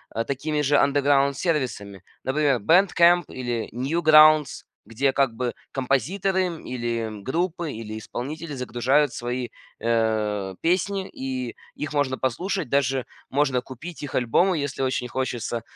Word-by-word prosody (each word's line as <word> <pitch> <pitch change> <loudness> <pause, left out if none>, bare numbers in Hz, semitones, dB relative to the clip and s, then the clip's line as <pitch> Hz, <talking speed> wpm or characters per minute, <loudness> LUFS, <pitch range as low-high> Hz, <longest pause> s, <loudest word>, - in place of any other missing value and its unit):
э, 115 - 0
такими 150 +2 -2
же 145 0 +2
underground 140 0 +3
сервисами, 115 - -2 0.2
например, 140 -1 +1
BandCamp 175 - +4
или 120 -3 -4
Newgrounds, 155 +2 +5 0.2
где, 135 +4 0
как 135 -3 +2
бы, 125 0 -2 0.2
композиторы, 185 - 0
м, 170 -3 -6
или, 120 -2 -2
м, 105 -2 -8
группы, 170 - -2
или 110 -2 -6
исполнители 150 +8 -6
загружают 130 +3 +1
свои, 120 0 -3 0.3
э, 110 -4 0
песни, 190 +3 0
и 130 -5 -5 0.2
их 150 0 -5
можно 140 -3 0
послушать, 170 +8 -2
даже 135 -2 +1 0.2
можно 135 -2 +1
купить 140 +7 -9
их 145 -2 -6
альбомы, 170 +10 +2
и - - -1
если 140 -1 -4
очень 130 -1 -1
хочется. 120 -2 -3
135 Hz, 135 wpm, -24 LUFS, 120-155 Hz, 0.3 s, Newgrounds